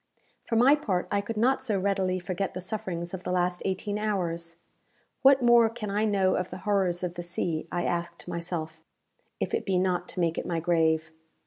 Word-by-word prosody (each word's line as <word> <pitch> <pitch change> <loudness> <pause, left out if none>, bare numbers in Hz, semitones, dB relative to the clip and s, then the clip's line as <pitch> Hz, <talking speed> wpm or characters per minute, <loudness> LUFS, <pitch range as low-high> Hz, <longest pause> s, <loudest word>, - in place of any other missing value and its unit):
For 230 - -1
my 250 +5 +6
part, 195 -12 -1
I 200 - +2
could 215 +2 -5
not 260 +4 +3
so 220 -7 0
readily 190 -1 +1
forget 185 +1 -3
the - - -3
sufferings 180 -3 -4
of 190 - -4
the - - -3
last 180 0 0
eighteen 205 +2 -2
hours. 170 -6 -2 0.7
"What 270 -1 +6
more 240 -1 +6
can 220 -3 -5
I 210 +2 +1
know 195 -3 +2
of 180 - -1
the 180 - -7
horrors 190 -4 +1
of 175 -1 -2
the 175 - -5
sea," 170 -2 -2
I 175 0 -1
asked 175 0 -3
myself, 170 -2 -4 0.6
"if - - -2
it - - 0
be 190 -2 +1
not 180 -1 0
to - - -6
make 165 -2 +1
it - - -5
my 170 -2 -1
grave?" 160 -2 +1
185 Hz, 205 wpm, -28 LUFS, 175-210 Hz, 0.7 s, my